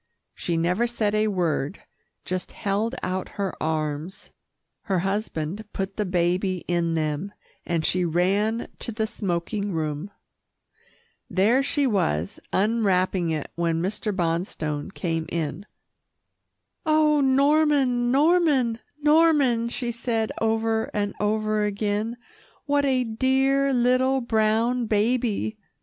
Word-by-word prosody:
She 170 -2 -2
never 180 +8 +1
said 220 -3 -1
a 215 0 +2
word, 175 -4 -1 0.4
just 185 0 -3
held 215 +4 -1
out 185 0 -2
her 200 -2 -1
arms. 155 +3 -3 0.5
Her 195 -4 +1
husband 195 -1 -2
put 195 0 -3
the 210 -2 -1
baby 180 +1 0
in 170 -1 0
them, 155 +5 -2 0.3
and 165 -2 0
she 180 0 +1
ran 195 +7 +1
to - - -3
the 220 0 -1
smoking 200 -1 -2
room. 155 +2 -3 1.2
There 220 +8 +3
she 285 +1 +1
was, 90 - 0
unwrapping 190 -4 +1
it 155 -2 -3
when 170 -1 0
Mr. 210 +4 -2
Bonstone 165 -4 -2
came 165 -4 -2
in. 170 +4 -3 1.2
"Oh, 310 -1 +3
Norman, 275 -2 +3
Norman, 280 -5 +3 0.2
Norman," 295 -7 +4
she 240 0 -3
said 225 -1 -1
over 225 0 +1
and 205 -1 -1
over 215 0 +1
again, 210 +2 -1 0.5
"what 285 0 +2
a 260 -2 +2
dear 265 +4 +2
little 255 +1 +3
brown 230 +1 +1
baby!" 220 0 0
210 Hz, 115 wpm, -25 LUFS, 180-240 Hz, 1.2 s, Norman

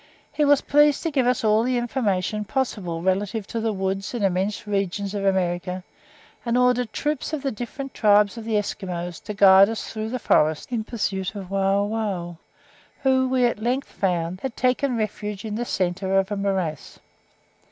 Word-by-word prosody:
He 300 - 0
was 290 -1 +5
pleased 295 0 +3
to 330 - -1
give 265 -4 +1
us 250 -1 +1
all 215 0 +4
the 250 +1 0
information 215 -4 -1
possible 195 -8 -2
relative 195 +3 0
to 230 - -4
the 225 0 0
woods 195 +2 -3
and 230 - -2
immense 195 +2 0
regions 200 -1 -2
of 200 -1 -3
America, 180 -1 0 0.6
and 235 0 0
ordered 250 -2 +2
troops 300 +1 -2
of 295 -3 -3
the 275 - 0
different 250 +4 -6
tribes 210 -1 +4
of 230 - -7
the 220 -1 0
Esquimaux 180 -4 -3
to 210 - -4
guide 195 0 +7
us 225 - -5
through 220 0 -3
the 255 - -2
forests 155 -5 +1
in 230 -3 -1
pursuit 200 -4 -3
of 195 -2 -7
Wauwau, 195 -2 -1 0.7
who, 260 -1 +3
we 255 -1 +3
at 235 -3 0
length 255 +4 -1
found, 180 -1 -2
had 265 -3 -5
taken 255 0 +1
refuge 210 -1 -4
in 215 - -4
the 235 +3 -2
centre 190 -1 0
of 195 +1 +1
a - - 0
morass. 190 -7 -2
210 Hz, 180 wpm, -24 LUFS, 190-245 Hz, 0.7 s, guide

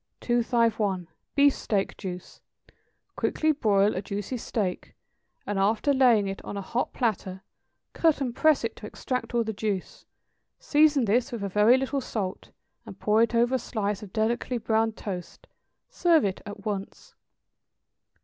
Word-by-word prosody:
251. 230 -6 +1 0.3
=Beefsteak 275 -8 +2
Juice.= 180 -1 -8 0.7
Quickly 310 0 +1
broil 210 -7 +2
a 185 - -2
juicy 200 +5 -4
steak, 210 -5 -3 0.5
and 205 -1 -2
after 220 +8 +2
laying 240 -6 +4
it 195 0 -5
on 200 - -6
a - - -3
hot 240 +5 -2
platter, 195 -6 -2 0.5
cut 325 -4 +2
and 250 -4 -2
press 310 -4 +3
it 230 - -3
to 210 - -9
extract 250 +2 -4
all 235 - +3
the 220 0 -4
juice; 200 -3 -4 0.5
season 295 -3 +3
this 230 +4 +1
with 230 -4 -4
a 200 - -2
very 210 +6 +5
little 270 +1 -1
salt, 200 -6 -4 0.3
and - - -11
pour 215 +1 +3
it 235 +1 +2
over 240 +2 +3
a 260 - +2
slice 210 -4 -3
of 205 -3 -10
delicately 235 +3 -1
browned 225 0 0
toast; 180 -4 -7 0.4
serve 345 - +3
it 190 -1 -2
at 205 -1 -9
once. 200 -2 -5
220 Hz, 150 wpm, -27 LUFS, 200-250 Hz, 0.7 s, very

